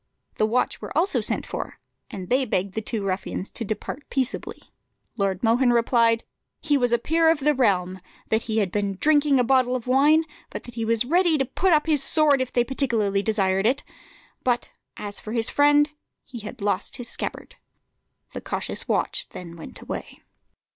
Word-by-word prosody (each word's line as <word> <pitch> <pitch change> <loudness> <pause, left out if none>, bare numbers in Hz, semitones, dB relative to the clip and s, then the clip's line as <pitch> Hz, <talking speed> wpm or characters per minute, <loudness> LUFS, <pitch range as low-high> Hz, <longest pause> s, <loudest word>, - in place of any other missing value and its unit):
The 215 - +3
watch 245 +3 0
were - - -5
also 370 +4 +2
sent - - -2
for, - - -5 0.3
and 185 -3 -7
they 260 +2 +3
begged 195 -5 -1
the 220 - -2
two 215 -1 -3
ruffians 190 0 -3
to 235 - -2
depart 220 +6 -5
peaceably. 260 -2 -3 0.4
Lord 195 -3 -1
Mohun 240 +2 +4
replied, 230 -1 +3 0.4
"He 295 -2 +1
was 245 -3 +2
a 240 - +4
peer 325 +5 +2
of 320 -3 +2
the 300 +2 +3
realm, 190 -8 +1 0.3
that 220 +1 +2
he 225 -2 -3
had 200 -5 +1
been 200 -1 -1
drinking 290 -3 +4
a - - +4
bottle 255 0 +3
of 245 - -4
wine, 290 +5 +4 0.3
but - - -7
that 240 - -11
he 230 -1 -3
was 230 +1 +1
ready 340 +2 +3
to 270 - +1
put 375 +8 0
up 305 -2 +4
his 305 -4 +2
sword 290 -1 +3
if 255 - -2
they 240 - +2
particularly 230 -7 0
desired 195 -2 +1
it: 265 +4 +1 0.6
but 245 -1 0 0.3
as 205 -1 -5
for 215 - -7
his 230 -1 +1
friend, 290 +1 +4 0.3
he 245 - -9
had 220 +2 -9
lost 200 -1 -1
his 245 - -4
scabbard." - - -5 0.8
The - - -5
cautious - - -4
watch - - -1
then 170 -2 -9
went 165 - -9
away. - - -7
240 Hz, 190 wpm, -24 LUFS, 210-275 Hz, 0.8 s, Mohun